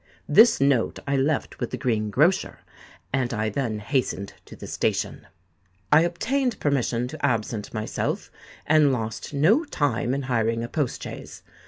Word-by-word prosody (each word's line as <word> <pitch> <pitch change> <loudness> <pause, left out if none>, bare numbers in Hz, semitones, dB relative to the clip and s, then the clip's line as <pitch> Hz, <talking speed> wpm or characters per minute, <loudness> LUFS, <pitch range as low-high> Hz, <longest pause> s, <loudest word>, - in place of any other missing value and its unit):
This 230 +2 +6
note 135 -4 +2
I 140 - 0
left 135 +2 0
with 120 - -2
the - - -4
green 110 -4 0
grocer; 155 - +1 0.5
and 130 -3 0
I 110 0 0
then 110 -1 -2
hastened 105 -3 -2
to - - -12
the - - -10
station. - - -2 0.6
I 155 - +7
obtained 245 +10 0
permission 125 -4 0
to - - -9
absent 110 -2 -1
myself, 110 -1 -3 0.3
and 150 -2 +4
lost 110 -3 -4
no 185 - +3
time 135 - -1
in 140 - -3
hiring 115 -2 0
a - - -3
post 145 0 -2
chaise. - - -9
130 Hz, 155 wpm, -25 LUFS, 115-150 Hz, 0.6 s, I